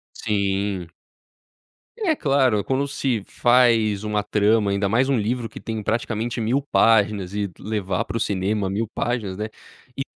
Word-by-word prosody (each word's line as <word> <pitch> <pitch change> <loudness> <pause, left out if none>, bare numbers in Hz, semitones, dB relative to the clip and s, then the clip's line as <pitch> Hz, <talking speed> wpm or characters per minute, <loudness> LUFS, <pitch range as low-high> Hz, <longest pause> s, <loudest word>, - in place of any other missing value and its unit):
Sim. 100 -3 -1 1.1
É 380 -9 +1
claro, 135 - +2
quando 135 +1 0
se 130 -6 -1
faz 115 -4 +3
uma 105 -1 -1
trama, 105 0 +2
ainda 100 0 +1
mais 125 +6 +2
um 135 - +3
livro 115 +2 -1
que - - -10
tem 110 -1 -5
praticamente 115 +2 -2
1.000 120 +5 +1
páginas, 105 -7 +2
e 105 -1 -1
d 90 - -18
levar 105 0 -2
para - - -3
o - - -2
cinema 100 -1 -1
1.000 105 +4 -1
páginas, 110 -4 -3
né. 105 - -2 0.5
E 135 - -1
110 Hz, 160 wpm, -23 LUFS, 100-120 Hz, 1.1 s, faz